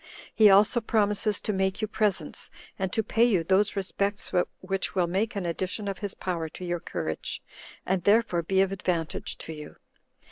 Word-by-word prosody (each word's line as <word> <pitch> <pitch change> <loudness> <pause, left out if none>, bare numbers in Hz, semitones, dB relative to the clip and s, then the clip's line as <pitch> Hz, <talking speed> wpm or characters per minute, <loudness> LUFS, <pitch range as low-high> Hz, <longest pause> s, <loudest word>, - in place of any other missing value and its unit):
He 215 -2 +7
also 205 +5 +5
promises 210 -2 +1
to 210 - -1
make 190 0 0
you 215 - -1
presents, 205 -7 -1 0.3
and 190 -1 -1
to 220 - 0
pay 225 +2 +2
you 205 -8 +3
those 195 +5 +2
respects 200 +1 -2 0.3
which 190 +1 -3
will 180 -2 +3
make 195 +6 -1
an 195 -3 -2
addition 185 +4 -3
of 195 - -3
his 205 -2 -5
power 170 -3 -3
to 180 - -8
your 175 0 -2
courage, 80 - -4 0.5
and 185 -2 0
thereby 205 -3 +3
be 190 +3 +2
of 195 0 +1
advantage 175 -4 -2
to 160 - -6
you." 150 -1 -10
190 Hz, 180 wpm, -27 LUFS, 175-210 Hz, 0.5 s, He